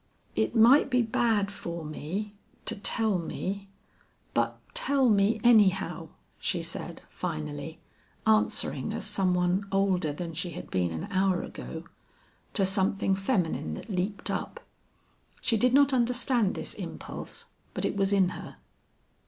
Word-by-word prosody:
"It 110 0 0
might 245 +6 +7
be 250 -2 +3
bad 220 -3 +1
for 170 -4 -6
me 185 +8 -4 0.3
to - - -1
tell 210 -1 +1
me, 195 +4 -4 0.6
but - - 0
tell 280 - +3
me, 205 +2 +3
anyhow," 205 -5 +4 0.3
she - - -1
said, - - -6
finally, 155 -2 -5 0.5
answering 220 -1 +2
as - - -3
some 185 -2 +1
one 180 +3 +1
older 190 -5 +2
than 165 +3 -5
she 175 +1 -4
had 180 - -8
been 90 -2 +1
an 80 -1 -4
hour 190 -1 +2
ago 160 0 -7 0.7
to 195 - +3
something 195 0 +1
feminine 190 - 0
that 210 - -8
leaped 195 +2 -1
up. - - -4 0.8
She 230 - +1
did 245 +3 +3
not 280 +1 +5
understand 245 -3 +2
this - - -4
impulse, - - -6 0.3
but - - +1
it - - -1
was 195 0 +1
in 195 -3 +4
her. - - -8
195 Hz, 140 wpm, -28 LUFS, 175-220 Hz, 0.8 s, might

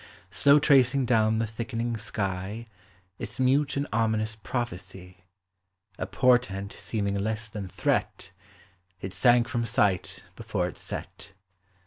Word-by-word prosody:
Slow 140 +1 +5
tracing 135 -2 +4
down 110 -2 +3
the 115 - +1
thickening 115 +1 -3
sky 105 0 -4 0.5
Its 105 - -5
mute 135 +2 +2
and 140 - 0
ominous 110 -1 0
prophecy, 95 -5 -6 0.7
A - - -2
portent 120 -7 +2
seeming 100 -3 -2
less 110 +1 -2
than 105 -2 -6
threat, - - -1 0.7
It 95 0 -6
sank 120 +4 +4
from 120 -3 -1
sight 100 -4 0
before 105 -5 -2
it 90 - -8
set. 100 - -8
110 Hz, 120 wpm, -27 LUFS, 100-120 Hz, 0.7 s, Slow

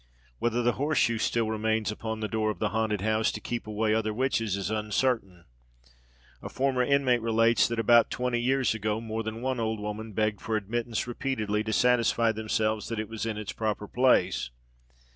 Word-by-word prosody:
Whether 120 +1 0
the 120 - +3
horse 150 0 +1
shoe 115 -2 +2
still 115 0 0
remains 110 0 0
upon 110 0 -5
the 110 - -1
door 110 0 0
of 105 - -3
the 105 - 0
haunted 110 -2 -1
house, 110 +1 +1
to - - -5
keep 120 -2 -5
away 110 0 0
other 110 -1 0
witches, 115 -5 0
is 100 0 -3
uncertain. 105 -4 -1 1.0
A - - -7
former 130 -1 0
inmate 130 -2 +2
relates 115 -1 +3
that, 115 - -3
"about 115 +1 +5
twenty 125 -1 -1
years 130 0 +2
ago, 110 0 -2
more 110 0 -4
than 110 +2 -5
one 130 -1 -1
old 110 -1 -1
woman 105 +1 -5
begged 105 -1 0
for 110 - -2
admittance 115 +2 -2
repeatedly, 115 -4 -2
to 110 - -2
satisfy 115 -1 +3
themselves 110 0 -1
that 115 -2 -3
it 110 -1 -4
was 115 0 -4
in 110 -2 -3
its 105 -2 -5
proper 105 -2 -2
place. 125 - +2
110 Hz, 190 wpm, -28 LUFS, 110-120 Hz, 1.0 s, about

